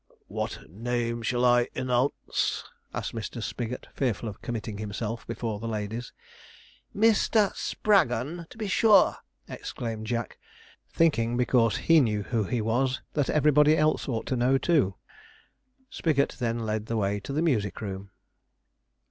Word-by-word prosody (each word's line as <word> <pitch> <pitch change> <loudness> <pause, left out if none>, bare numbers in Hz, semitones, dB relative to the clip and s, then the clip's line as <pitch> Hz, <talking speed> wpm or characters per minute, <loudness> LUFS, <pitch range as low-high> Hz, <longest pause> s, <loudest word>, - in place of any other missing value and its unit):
'What - - -5
name 115 +5 -2
shall 120 +2 +1
I 120 0 +4
_e_nounce?' 130 +1 0 0.3
asked - - -4
Mr. 115 +1 -5
Spigot, 120 +2 -4
fearful 120 -4 -1
of 105 - -8
committing 110 -3 -5
himself 110 +2 -4
before 115 -2 -3
the 115 - -5
ladies. 110 +2 -4 0.8
'MISTER 215 -1 +3
SPRAGGON, 165 - +1
to - - -14
be 215 -2 -3
sure,' 200 0 +5 0.3
exclaimed 110 -2 -5
Jack, 115 0 -3 0.5
thinking, 120 -8 +2
because 120 -2 +3
he 165 -1 +5
knew 105 -5 0
who 110 -1 -1
he 120 +3 -1
was, 125 +4 0
that 145 -3 0
everybody 150 0 +4
else 155 -2 +1
ought 115 -3 -2
to 130 - -1
know 125 +2 +3
too. 135 - +2 1.0
Spigot 140 -4 +1
then 115 -2 0
led 110 0 -2
the 115 - -1
way 100 -1 0
to 100 - -7
the 155 +4 0
music 110 - 0
room. 100 -1 -6
120 Hz, 140 wpm, -27 LUFS, 110-140 Hz, 1.0 s, sure